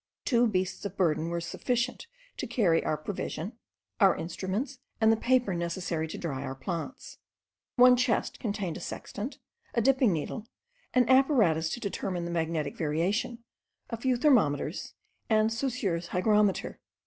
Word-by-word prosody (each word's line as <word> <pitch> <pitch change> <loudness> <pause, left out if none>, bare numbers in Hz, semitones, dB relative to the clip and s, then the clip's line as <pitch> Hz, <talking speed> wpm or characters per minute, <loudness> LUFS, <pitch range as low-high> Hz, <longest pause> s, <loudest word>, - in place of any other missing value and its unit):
Two 240 -1 +4
beasts 185 -3 -1
of 200 -2 -5
burden 165 -2 +1
were 170 0 -1
sufficient 245 - -2 0.3
to 260 - -3
carry 200 -9 +2
our 155 - 0
provision, 180 +3 -4 0.5
our 195 -4 +6
instruments, 205 - -3 0.2
and 220 0 +5
the - - +5
paper 245 -3 +2
necessary 170 -1 -2
to - - -6
dry 140 -6 -3
our 135 -1 -4
plants. 170 - -6 0.6
One 250 0 +8
chest 250 -2 0
contained 200 -6 -3
a - - -7
sextant, 220 +8 -6 0.4
a - - +3
dipping 260 -2 +4
needle, 185 +7 -3 0.5
an 250 -2 +5
apparatus 230 - +4
to - - -4
determine 185 -4 -3
the 170 - -4
magnetic 160 -3 -1
variation, 185 +10 -1 0.5
a 230 - -2
few 255 +2 +1
thermometers, 200 - +2 0.3
and 220 0 +3
Saussure's 225 -9 -1
hygrometer. 205 +2 +1
200 Hz, 145 wpm, -29 LUFS, 170-240 Hz, 0.6 s, One